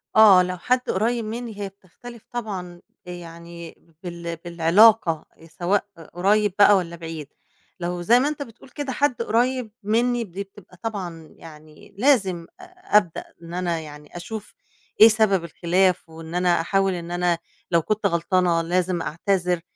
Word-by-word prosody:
آه، 200 -4 +8
لو 180 0 -4
حد 250 +7 0
قريب 230 +3 0
مني 225 -1 -6
هي 200 -1 -4
بتختلف 210 +5 -14
طبعًا، 185 -7 -5 0.2
يعني 170 -1 -10 0.3
بال 170 -1 -5
بالعلاقة 170 +1 +4 0.2
سواء 180 +5 -1 0.3
قريّب 205 +3 +2
بقى 205 -1 +7
والّا 170 -2 -3
بعيد. 165 -3 -7 0.5
لو 175 0 -3
زي 235 +8 +5
ما 275 - +1
أنت 300 -1 -4
بتقول 230 +1 -16
كده 280 +1 -5
حد 260 -3 0
قريّب 240 0 0
مني 235 +3 +1
دي 200 0 -6
بتبقى 190 -2 -18
طبعًا 180 -8 -6
يعني 155 +3 -15
لازم 200 -9 +2
أبدأ 360 - 0 0.2
إن 170 0 -10
أنا 175 -2 -1
يعني 150 +1 -11
أشوف 210 +4 -8 0.5
إيه 220 - +12
سبب 215 -5 +3
الخلاف 175 +1 +1
وإن 160 +1 -9
أنا 180 -2 +2
أحاول 195 +2 +1
إن 175 -1 -6
أنا 175 -1 +1 0.3
لو 170 -1 +4
كنت 215 +5 -2
غلطانة 170 -1 +2
لازم 175 +1 0
أعتذر. 180 +2 -1
185 Hz, 145 wpm, -23 LUFS, 170-220 Hz, 0.5 s, إيه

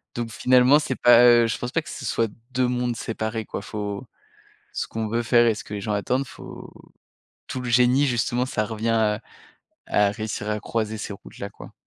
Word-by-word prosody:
donc 120 -1 -3
finalement, 125 +5 +5
c'est 135 -3 -3
pas, 120 0 +7
heu, 120 -1 +6
je 115 - -2
pense 125 - -5
pas 165 - +1
que - - -12
ce - - -7
soit 115 +1 0 0.2
2 125 0 +1
mondes 125 -1 -1
séparés, 110 0 -3
quoi, - - -5
faut 105 -2 -5 0.7
ce - - -3
qu'on 110 -1 -3
veut 115 +2 -1
faire 120 0 +4
et 115 - +3
ce - - -7
que 105 - -10
les 100 - -5
gens 105 +1 -2
attendent, 125 +6 -1
faut - - -11 0.8
tout 130 - -4
le 125 - -4
génie, 125 +4 +4
justement, 120 0 0
ça 110 -4 -1
revient 110 +1 -3
à 110 -1 +1 0.7
à 105 -1 +3
réussir 105 0 -4
à 105 0 -2
croiser 110 -1 -2
ces 105 - -5
routes-là, 100 0 -9
quoi. - - -13
115 Hz, 205 wpm, -24 LUFS, 105-125 Hz, 0.8 s, pas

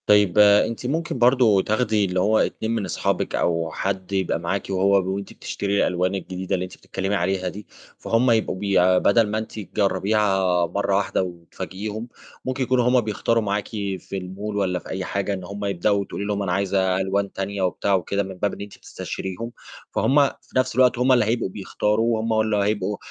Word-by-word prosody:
طيب 105 -2 +4
أنتِ 105 +3 +4
ممكن 150 -2 -2
برضه 120 -5 +5
تاخدي 110 0 +1
اللي 90 -1 -1
هو 110 +4 +3
2 110 - -1
من 115 -3 -1
أصحابِك 90 - -1
أو 85 -1 0
حد 95 +1 -3
يبقى 95 -4 0
معاكِ 95 +3 -2
وهو 95 0 +2
وأنتِ 100 0 -6
بتشتري 100 0 -3
الألوان 90 +2 0
الجديدة 95 0 -3
اللي 90 - -2
أنتِ 90 - -12
بتتكلمي 95 +2 -3
عليها 95 0 0
دي، 105 +3 -10 0.3
فهُم 120 +2 +2
يبقوا 110 -4 +1
بيع 95 -2 +3
بدل 110 +4 +4
ما 105 +1 -2
أنتِ 110 0 -5
تجربيها 95 -2 +1
مرة 100 +3 -1
واحدة 95 -1 +1
وتفاجئيهم، 95 +5 -6 0.4
ممكن 130 +1 -1
يكونوا 125 -1 +2
هُم 125 0 +4
بيختاروا 115 +1 0
معاكِ 100 0 -1
في 100 -2 -4
الmall 100 +3 -6
والّا 90 -2 0
في - - -13
أي 95 0 -3
حاجة 100 +1 -2
إن 95 -2 -5
هُم 100 +3 -6
يبدأوا، 100 +1 +1
وتقولي 100 0 -4
لهم: 100 -1 -1
"أنا 95 - -2
عايزة 95 0 +1
ألوان 100 +1 -1
تانية." 100 +1 -3
وبتاع 95 +2 0
وكده 100 +2 -1
من 95 0 -7
باب 100 +1 -1
إن - - -8
أنتِ 100 0 -9
بتستشيريهم، 95 +5 -6 0.4
فهُم 140 +1 +4
في - - -9
نَفْس 130 - +1
الوقت 125 -2 +4
هُم 125 +1 +3
اللي 120 -4 +5
هيبقوا 115 -2 0
بيختاروا، 105 +3 0
هُم 115 0 -1
اللي 110 -1 +1
هيبقوا 100 0 0
100 Hz, 185 wpm, -23 LUFS, 95-110 Hz, 0.4 s, برضه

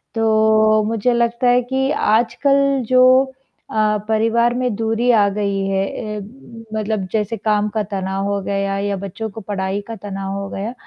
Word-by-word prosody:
तो, 220 -1 +3
मुझे 230 +2 +1
लगता 235 +1 +1
है 245 0 +4
कि 265 +2 -1
आजकल 275 +5 +2
जो 255 0 +5 0.7
अ, 215 -1 +2
परिवार 230 +2 +2
में 250 -1 -1
दूरी 225 +2 0
आ 210 -3 +4
गई 200 -1 -1
है 195 0 0 0.3
अ, - - -4 0.6
मतलब 210 -3 -2
जैसे 220 +1 -1
काम 210 0 0
का 215 - +1
तनाव 195 0 -2
हो 200 - -2
गया 195 0 -2
या 200 0 -1
बच्चों 220 +3 -5
को 220 +2 -9
पढ़ाई 195 0 -3
का 230 - -6
तनाव 195 -2 -6
हो 195 - -6
गया, 210 +5 -5
215 Hz, 165 wpm, -19 LUFS, 200-235 Hz, 0.7 s, जो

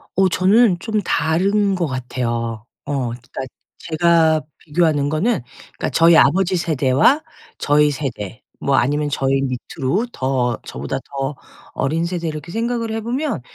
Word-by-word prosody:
어 190 0 +4
저는 190 +1 +4
좀 215 +3 -1
다른 195 +5 +1
것 175 -3 -1
같아요. 120 -3 -3 0.2
어 145 - -3 0.2
그러니까 120 0 -9 0.4
제가 160 -1 +3 0.2
비교하는 150 -3 +1
거는 175 - +1 0.4
그러니까 - - -2
저희 165 0 +5
아버지 185 +6 +4
세대와 155 - +3 0.4
저희 150 0 +3
세대 125 -6 -5 0.2
뭐 140 - +1
아니면 145 +4 +1
저희 135 -1 +1
밑으로 135 - -2
더 125 -3 0
저보다 70 +3 -4 0.2
더 135 +1 -2 0.4
어린 160 +5 0
세대 170 -1 -3
이렇게 155 +1 -6
생각을 230 +1 -2
해 225 0 -2
보면 255 - -2
155 Hz, 290 characters per minute, -20 LUFS, 135-185 Hz, 0.4 s, 저희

